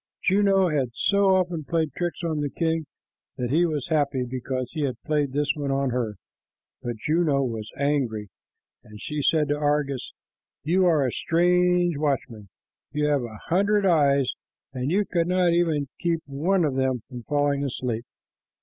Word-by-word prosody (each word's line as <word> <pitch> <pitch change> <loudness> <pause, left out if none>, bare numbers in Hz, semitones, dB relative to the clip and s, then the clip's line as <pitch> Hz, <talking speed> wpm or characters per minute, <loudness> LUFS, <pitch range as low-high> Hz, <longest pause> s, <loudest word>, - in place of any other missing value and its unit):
Juno 195 -1 +3
had 140 -5 0
so 200 -1 +3
often 175 -4 0
played 160 -2 -1
tricks 175 +2 -3
on 160 -3 -1
the 145 - -1
king 160 0 -1 0.5
that 125 -2 -2
he 170 +4 +3
was 150 -2 -3
happy 140 -5 +1
because 130 0 -3
he 155 - -4
had 130 -5 -2
played 150 -3 0
this 145 +1 +1
one 145 -2 -4
on 135 -1 0
her, 120 -4 -2 0.7
but 120 -1 -3
Juno 150 +1 +1
was 110 -4 -4
angry, 130 -8 -1 0.5
and 105 0 -13
she 150 +5 -3
said 150 +1 +2
to 145 - +1
Argus, 145 -3 -1 0.5
"You 180 +4 +3
are 155 -5 +3
a 125 - 0
strange 175 +1 +2
watchman. 135 -8 -2 0.4
You 150 +1 0
have 145 -2 +2
a 115 -3 -7
hundred 200 +3 +3
eyes, 140 -7 +3 0.4
and 130 +1 -2
you 200 +5 +2
could 170 -3 0
not 180 -1 +3
keep 170 0 +3 0.5
even - - -6
one 165 +6 +1
of 145 - 0
them 130 -3 0
from 125 -2 -8
falling 145 +1 0
asleep. 125 -4 -3
145 Hz, 170 wpm, -25 LUFS, 130-170 Hz, 0.7 s, Juno